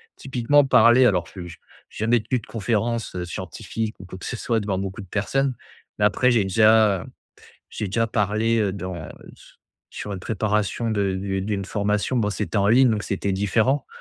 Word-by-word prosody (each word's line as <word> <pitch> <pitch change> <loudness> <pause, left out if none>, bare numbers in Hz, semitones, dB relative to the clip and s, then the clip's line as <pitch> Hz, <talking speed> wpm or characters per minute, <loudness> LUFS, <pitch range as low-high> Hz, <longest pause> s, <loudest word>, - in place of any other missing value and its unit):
typiquement 135 +2 +2
parler 120 0 +6
alors 90 -5 +2
je 90 - -7
j'ai 85 -1 -10 0.3
jamais 115 +2 +1
tenu 125 +3 -2
de 110 - -16
conférences, 115 +2 -2
heu, 90 -1 -4
scientifiques 100 +6 -5
ou 95 - -10
quoi 95 +1 -9
que - - -9
ce 125 - -4
soit 115 0 0
devant 100 -2 -2
beaucoup 95 +2 -5
de 95 - -11
personnes. 130 +7 0 0.5
Mais 105 - +4
après 125 +4 +3
j'ai 115 -4 +3
déjà 110 -1 +4 0.6
j'ai 105 - -4
déjà 115 +4 0
parlé, 110 +1 +1
heu, 100 -3 0
dans, 95 -2 -5
heu, 80 -2 -7 0.2
s - - -19 0.4
sur 105 -1 -5
une 95 - -7
préparation 105 +2 -1
de 100 -3 0
de 95 0 -2
d'une 100 -1 -3
formation, 105 +5 -1
bon 105 -3 +1
c'était 105 +1 -3
en 100 0 +3
ligne, 125 +4 +5
donc 105 -1 -1
c'était 100 0 -2
différent. 110 +8 +1
105 Hz, 195 wpm, -23 LUFS, 95-115 Hz, 0.6 s, parler